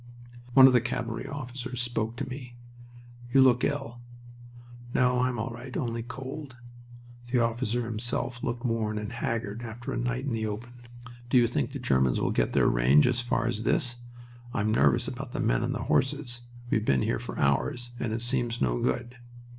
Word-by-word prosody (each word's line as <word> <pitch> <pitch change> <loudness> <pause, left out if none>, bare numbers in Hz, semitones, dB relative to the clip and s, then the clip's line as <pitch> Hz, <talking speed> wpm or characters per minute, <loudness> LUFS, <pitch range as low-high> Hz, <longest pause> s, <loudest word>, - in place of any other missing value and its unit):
One 135 -1 +10
of 130 - +7
the 120 - +5
cavalry 115 -1 -3
officers 130 -3 -5
spoke 120 -2 -1
to - - -4
me. 125 -2 -8 0.8
"You 135 - +5
look 125 -1 +4
ill." 135 -5 -2 0.9
"No, 125 0 +3
I'm 125 -1 +1
all 115 +2 -3
right. 125 +2 -7
Only 115 -2 -2
cold." 130 +3 -7 0.7
The 125 - +3
officer 115 0 0
himself 120 +2 -2
looked 120 +1 -3
worn 110 -2 0
and 105 +2 -4
haggard 115 -2 -3
after 120 +1 -6
a - - -2
night 125 +2 -1
in 140 - -2
the 110 -1 -1
open. 115 +3 -6 0.6
"Do 130 - +4
you 120 - +6
think 120 - -1
the - - -4
Germans 65 -2 +2
will - - +1
get - - +1
their - - +4
range 65 +5 +5
as 125 0 +2
far 120 -1 0
as 115 -2 -1
this? 120 -2 +1 0.6
I'm 105 +1 +1
nervous 70 -9 +3
about - - -6
the - - -3
men - - +2
and - - -1
the - - -3
horses. 135 -3 0 0.3
We've 110 - +2
been 65 - +2
here - - 0
for - - -7
hours, 120 - 0
and 115 - -2
it 115 +2 -1
seems 120 -1 0
no - - +1
good." 120 - -1
120 Hz, 185 wpm, -28 LUFS, 110-125 Hz, 0.9 s, One